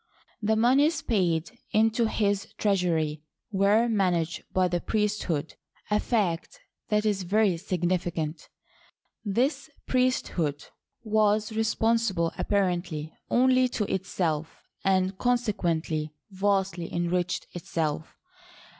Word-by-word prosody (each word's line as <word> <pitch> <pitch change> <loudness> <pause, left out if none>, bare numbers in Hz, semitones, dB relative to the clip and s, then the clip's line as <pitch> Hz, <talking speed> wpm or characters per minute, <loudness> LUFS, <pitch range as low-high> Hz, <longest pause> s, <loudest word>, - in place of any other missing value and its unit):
The 220 +1 +2
moneys 270 +8 +3
paid 170 -7 +1 0.2
into 225 +2 +3
his 205 -2 0
treasury 165 -7 +1 0.3
were 205 +4 +3
managed 175 -7 0
by 185 -1 +2
the 175 -1 -1
priesthood 205 -8 -1 0.2
— - - -28
a 210 - +4
fact 205 - -1 0.3
that 210 0 +2
is 205 -2 +1
very 195 +1 +2
significant. 175 -3 -2 0.7
This 265 +8 0 0.2
priesthood 185 - 0 0.4
was 215 -1 +2
responsible 220 -5 +1
apparently 175 -6 -1 0.2
only 255 +1 +4
to 220 - -1
itself, 165 -5 -2 0.2
and 190 0 +2
consequently 170 -10 0 0.2
vastly 190 -3 0
enriched 175 +1 -1
itself. 160 -2 -3
195 Hz, 100 wpm, -27 LUFS, 170-220 Hz, 0.7 s, a